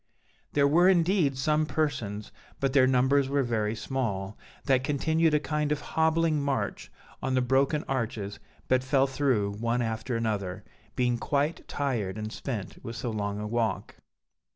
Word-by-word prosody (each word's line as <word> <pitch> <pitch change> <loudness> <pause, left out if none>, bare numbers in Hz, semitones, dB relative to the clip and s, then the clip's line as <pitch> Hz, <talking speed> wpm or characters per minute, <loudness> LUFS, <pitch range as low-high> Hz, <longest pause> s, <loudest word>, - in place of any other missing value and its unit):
"There 140 -1 +4
were 175 +6 +5
indeed 170 -6 +3
some 155 +3 +1
persons, 130 -9 -2 0.3
but 135 -1 0
their 130 -2 +6
numbers 130 +2 +3
were 140 0 +2
very 110 -3 -1
small, 110 -6 -3 0.3
that 130 -2 +3
continued 160 +3 +2
a - - +4
kind 150 -1 -1
of 150 - +1
hobbling 160 -1 +1
march 140 -1 -2 0.3
on 130 -1 0
the 130 - +3
broken 135 +4 +2
arches, 110 -6 -3 0.3
but 130 0 +2
fell 135 0 +3
through 130 -7 +1
one 115 +2 0
after 115 +2 -2
another, 105 -5 -2 0.3
being 125 -1 +1
quite 145 +5 -1
tired 115 -9 -2
and 110 +1 -5
spent 115 -8 -5
with 115 - -6
so 120 - -3
long 100 -1 -2
a 105 - -4
walk. 115 +1 -2
130 Hz, 155 wpm, -28 LUFS, 110-145 Hz, 0.3 s, their